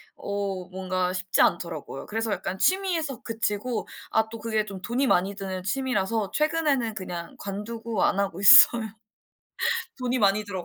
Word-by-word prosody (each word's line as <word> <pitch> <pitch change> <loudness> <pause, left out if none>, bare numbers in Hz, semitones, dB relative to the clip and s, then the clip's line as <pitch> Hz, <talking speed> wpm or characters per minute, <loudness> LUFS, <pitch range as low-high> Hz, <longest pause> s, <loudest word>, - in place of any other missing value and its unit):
어 200 -2 -4
뭔가 185 -1 -2
쉽지 185 0 0
않더라고요. 170 -5 -1
그래서 225 +1 -2
약간 190 -1 -3
취미에서 335 - 0
그치고 225 +1 -2 0.2
아 220 0 +1
또 230 0 -8
그게 220 -1 -1
좀 200 -2 -8
돈이 250 +6 0
많이 195 -1 +2
드는 190 -2 -5
취미라서 215 -2 -1
최근에는 300 -7 0
그냥 175 -4 -7
관두고 220 +2 -4
안 200 - +2
하고 195 -3 -2
있어요. 230 +3 +9 1.2
돈이 255 0 -1
많이 205 -1 +2
들어 190 -3 -6
210 Hz, 325 characters per minute, -26 LUFS, 190-235 Hz, 1.2 s, 있어요